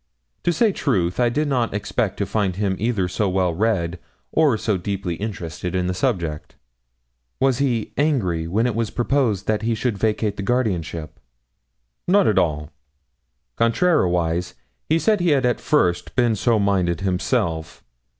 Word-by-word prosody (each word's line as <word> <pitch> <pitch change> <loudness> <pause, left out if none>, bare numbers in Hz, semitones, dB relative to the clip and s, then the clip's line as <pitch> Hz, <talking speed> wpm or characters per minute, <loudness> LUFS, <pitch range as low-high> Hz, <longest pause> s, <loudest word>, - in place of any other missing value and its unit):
To 175 - +4
say 220 +5 +3
truth, 95 - 0
I 120 -1 +4
did 150 +6 0
not 120 -7 0
expect 105 0 -1
to 100 - -1
find 95 -1 -1
him 100 -1 0
either 105 -4 0
so 100 +3 -1
well 90 -2 +1
read 90 -3 0 0.3
or 150 -7 +3
so 105 -1 0
deeply 95 -1 -3
interested 90 -3 -5
in 90 -1 0
the 90 - -1
subject.' 90 - -2 0.8
'Was 135 -1 +2
he 120 -6 0
angry 95 - +1
when 105 +7 +1
it 125 - +1
was 115 0 -1
proposed 120 -6 0
that 110 -1 0
he 115 +1 0
should 115 -2 -2
vacate 105 -1 0
the - - -3
guardianship?' 90 - -2 0.9
'Not - - +4
at - - +3
all. 75 +1 -1 0.9
Contrariwise, 90 - +1 0.3
he 160 - +4
said 210 +4 +2
he 175 0 +2
had 130 - 0
at 120 - 0
first 90 - +1
been 120 -3 +3
so 115 +3 +2
minded 95 -4 +1
himself. 85 -4 -1
105 Hz, 160 wpm, -22 LUFS, 90-120 Hz, 0.9 s, To